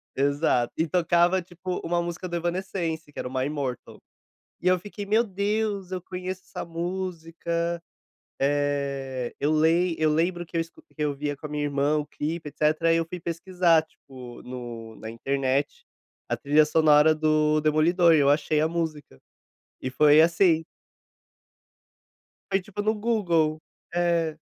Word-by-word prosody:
Exato, 140 -3 +1
e 160 - +1
tocava, 175 +2 +3
tipo, 180 +1 -5
uma 175 +1 +1
música 175 +1 -5
do 175 - -4
Evanescence, 170 -3 -3
que - - -8
era - - -3
o - - -8
My 130 0 0
Mortal. 140 -4 -4 0.6
E 180 - +1
eu 185 0 +4
fiquei, 205 +2 -7
"Meu 220 +3 +3
Deus! 200 -1 -2
Eu 185 -1 -3
conheço 185 +1 -6
essa - - -6
música.", 170 -1 -3 0.6
eh, 140 -3 -1
eu 145 - +1
lem 165 +3 +3
eu 155 -1 +3
lembro 175 +3 0
que 170 - -7
eu - - +2
escu 165 - -8
que 320 - -32
eu 145 -1 0
via 145 +1 -3
com 150 - -8
a - - -9
minha 150 0 -2
irmã 145 +1 +1
o 150 - -3
clipe, 160 +1 -4
etcétera, 155 +3 +1
aí, 165 - +4
eu 165 -1 0
fui 180 +1 -7
pesquisar, 170 -1 +2
tipo, 130 -5 -13
no 120 -3 -8
na 110 - -7
internet, 135 +3 -1 0.4
a - - 0
trilha 150 +2 +4
sonora 155 0 +5
do 155 0 +2
demolidor, 165 +3 +4
e - - +5
eu 140 -1 +4
achei 150 +1 +2
a 155 - +2
música. 160 - -4 0.6
E 130 - -2
foi 150 +3 +6
assim. 165 0 +4 1.9
Foi 195 - +3
tipo 205 +2 -6
no 215 +1 +1
Google. 175 -9 +1 0.3
É. 170 -3 +1
160 Hz, 160 wpm, -26 LUFS, 145-175 Hz, 1.9 s, foi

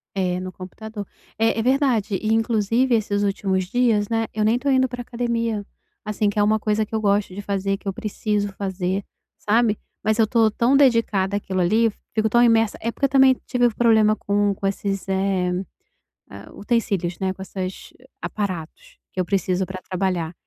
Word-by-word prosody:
É, 180 -2 0
no 185 0 -5
computador. 205 +3 -8 0.3
É 225 0 +2
é - - 0
verdade, 250 -6 +2
e 215 0 0
inclusive 225 +2 +1
esses 205 -2 +1
últimos 195 -2 0
dias, 220 0 +1
né, 225 0 0
eu 215 - -1
nem 230 +3 +3
tô 280 - -1
indo 260 -1 +3
pra 245 0 -6
academia, 235 -3 -2 0.4
assim, 210 0 0
que 205 - -6
é 205 - +4
uma 215 +1 +2
coisa 215 0 0
que 220 - -20
eu 220 - 0
gosto 200 -2 +1
de 205 - -6
fazer, 195 0 -1
que 200 - -13
eu 195 - -1
preciso 210 -1 -2
fazer, 190 0 -2 0.4
sabe, 220 0 +2 0.2
mas 215 +1 +1
eu 220 - +4
tô 225 -1 +3
tão 240 +5 +3
dedicada 225 -7 +3
àquilo 190 -2 -2
ali, 220 +6 +3 0.2
fico 220 0 +1
tão 240 +2 +4
imersa 225 -2 +3
é 230 +1 -2
porque 275 - -1
eu - - +1
também 265 -1 +5
tive 245 -1 +3
problema 220 -2 +4
com 205 -1 0
com 195 0 -3
esses, 195 0 -3
eh, 190 -1 0 0.8
ah, 100 +2 -11
utensílios, 200 -6 -1
né, 190 -1 -1
com 190 - -12
essas 190 0 -6 0.3
aparatos 205 - -5
que - - -6
eu 180 - +1
preciso 185 -1 0
pra 185 0 -7
trabalhar, 180 -3 -2
210 Hz, 190 wpm, -22 LUFS, 195-230 Hz, 0.8 s, também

